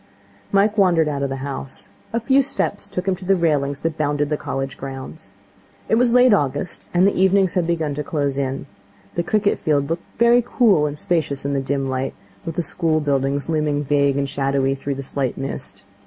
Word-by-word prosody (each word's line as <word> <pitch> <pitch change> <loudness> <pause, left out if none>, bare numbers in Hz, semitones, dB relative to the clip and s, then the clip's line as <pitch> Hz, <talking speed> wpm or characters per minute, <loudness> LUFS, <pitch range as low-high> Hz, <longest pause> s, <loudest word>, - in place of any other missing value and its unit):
Mike 205 +2 +3
wandered 170 -5 +4
out 145 -2 -2
of 140 - -1
the 135 - -3
house. 135 -1 -6 0.2
A 230 - 0
few 265 +4 +4
steps 255 -6 -2
took 180 +1 -4
him 190 - +2
to 190 - -11
the 195 +1 +3
railings 145 -5 0
that 165 -1 -2
bounded 145 0 0
the - - +3
College 135 -2 -4
grounds. 135 +3 -8 0.6
It - - -1
was 235 +1 +4
late 250 -1 +6
August, 145 -1 -1
and 180 +1 +4
the 200 - +3
evenings 190 -1 +3
had 175 -3 0
begun 160 -4 0
to 150 +1 -3
close 145 -4 -1
in. 135 0 -2 0.5
The 170 - 0
cricket 205 +3 +1
field 145 -2 0
looked 170 - -5
very 235 +1 +5
cool 210 - +3
and 145 0 -5
spacious 150 -4 -1
in 140 - 0
the 135 - 0
dim 135 0 -1
light, 130 0 -2 0.3
with 165 - -4
the 175 - 0
school 160 -2 +1
buildings 140 -1 0
looming 150 -2 0
vague 140 -1 +2
and 140 0 0
shadowy 135 0 0
through 140 +1 -4
the 140 - -5
slight 135 -1 -2
mist. 100 -7 -6
150 Hz, 205 wpm, -21 LUFS, 140-185 Hz, 0.6 s, late